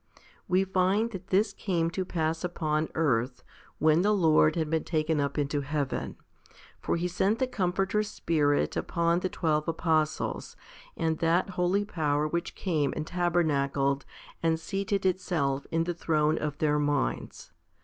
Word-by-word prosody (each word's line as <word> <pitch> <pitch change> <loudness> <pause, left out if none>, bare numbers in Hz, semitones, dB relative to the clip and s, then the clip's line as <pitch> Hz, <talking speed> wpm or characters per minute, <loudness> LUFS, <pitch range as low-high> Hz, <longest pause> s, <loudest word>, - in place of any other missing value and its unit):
We 185 +1 +3
find 190 +4 +1
that 190 -2 -8
this 200 +2 +2
came 170 -4 -1
to 185 - -2
pass 165 -2 -2
upon 155 -3 -1
earth, 125 -5 0 0.3
when 155 +1 +4
the 210 +2 +3
Lord 155 -4 +4
had 160 -2 0
been 160 +1 0
taken 155 -2 0
up 140 +1 -2
into 145 0 0
heaven. 145 -1 -3 0.6
For - - -1
He 170 +1 -1
sent 190 +5 +1
the 260 - +1
Comforter 195 -2 0
Spirit 155 -8 0
upon 170 0 +1
the 185 - -2
twelve 155 -4 0
apostles, 160 -2 -1 0.4
and 160 -1 0
that 170 +3 +2
holy 185 +3 +1
power 150 -6 0
which 170 +2 -3
came 155 -7 0
and 155 - -3
tabernacled 145 -6 +1 0.4
and 165 -1 +1
seated 195 +4 -2
itself 160 -7 0
in 165 0 +1
the 175 +1 -2
throne 155 -2 +1
of 150 -1 -3
their 150 -1 +2
minds. 145 - -2
165 Hz, 150 wpm, -28 LUFS, 150-180 Hz, 0.6 s, when